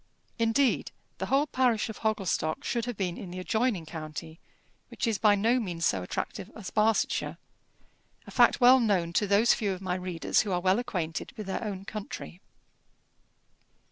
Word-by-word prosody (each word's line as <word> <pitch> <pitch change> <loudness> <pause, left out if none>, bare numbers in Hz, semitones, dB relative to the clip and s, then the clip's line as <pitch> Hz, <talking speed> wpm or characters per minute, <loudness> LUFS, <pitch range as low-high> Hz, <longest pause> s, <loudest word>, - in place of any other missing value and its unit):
Indeed 230 +3 +2 0.3
the - - -2
whole 275 +2 +3
parish 250 -6 +1
of 220 - -8
Hogglestock 195 -7 -1
should 235 -1 -1
have 245 -4 -5
been 180 -3 -2
in 185 - -7
the 180 - -7
adjoining 220 -1 0
county, 160 0 -7 0.5
which - - -3
is 225 -3 0
by 210 -2 +5
no 230 +5 +2
means 175 -7 -2
so 95 - +1
attractive 135 - -4
as 210 -5 -7
Barsetshire; 215 0 +1 0.9
a - - -11
fact - - +4
well 255 +1 +7
known 190 -8 +1
to 205 - +2
those 205 +4 +5
few 205 -3 -1
of 185 - -7
my 185 -1 -2
readers 180 -2 0
who 205 - -4
are 180 - +1
well 185 +4 +2
acquainted 170 -9 -4
with 215 - -5
their 195 +4 -3
own 195 -3 -5
country. 200 -4 -7
200 Hz, 175 wpm, -28 LUFS, 180-225 Hz, 0.9 s, well